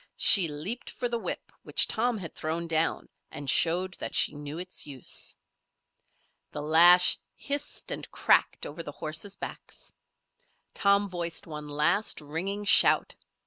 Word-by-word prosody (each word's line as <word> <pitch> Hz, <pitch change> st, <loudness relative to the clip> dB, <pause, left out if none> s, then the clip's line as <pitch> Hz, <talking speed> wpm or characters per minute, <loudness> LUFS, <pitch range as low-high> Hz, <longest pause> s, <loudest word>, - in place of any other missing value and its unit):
She 190 Hz, -6 st, +6 dB
leaped 160 Hz, +11 st, -4 dB
for 245 Hz, -, -4 dB
the 235 Hz, -1 st, -3 dB
whip -, -, -6 dB
which -, -, +2 dB
Tom 235 Hz, +1 st, 0 dB
had 175 Hz, -5 st, -8 dB
thrown 165 Hz, +2 st, -3 dB
down 165 Hz, 0 st, -1 dB, 0.2 s
and 145 Hz, -, -8 dB
showed 175 Hz, +6 st, +2 dB
that -, -, -5 dB
she -, -, +4 dB
knew 145 Hz, +1 st, -8 dB
its 180 Hz, -2 st, -6 dB
use. 135 Hz, -3 st, -3 dB, 1.2 s
The 145 Hz, -, -6 dB
lash 175 Hz, +4 st, +6 dB, 0.2 s
hissed 285 Hz, 0 st, -4 dB
and -, -, -5 dB
cracked -, -, +2 dB
over 155 Hz, +3 st, -7 dB
the 145 Hz, -3 st, -9 dB
horses' 160 Hz, +7 st, -5 dB
backs. -, -, -9 dB, 0.8 s
Tom 200 Hz, 0 st, +2 dB
voiced 170 Hz, -3 st, -3 dB
one 150 Hz, -2 st, -8 dB
last, 150 Hz, +9 st, 0 dB
ringing 180 Hz, +8 st, -4 dB
shout. -, -, +4 dB
170 Hz, 145 wpm, -27 LUFS, 155-200 Hz, 1.2 s, She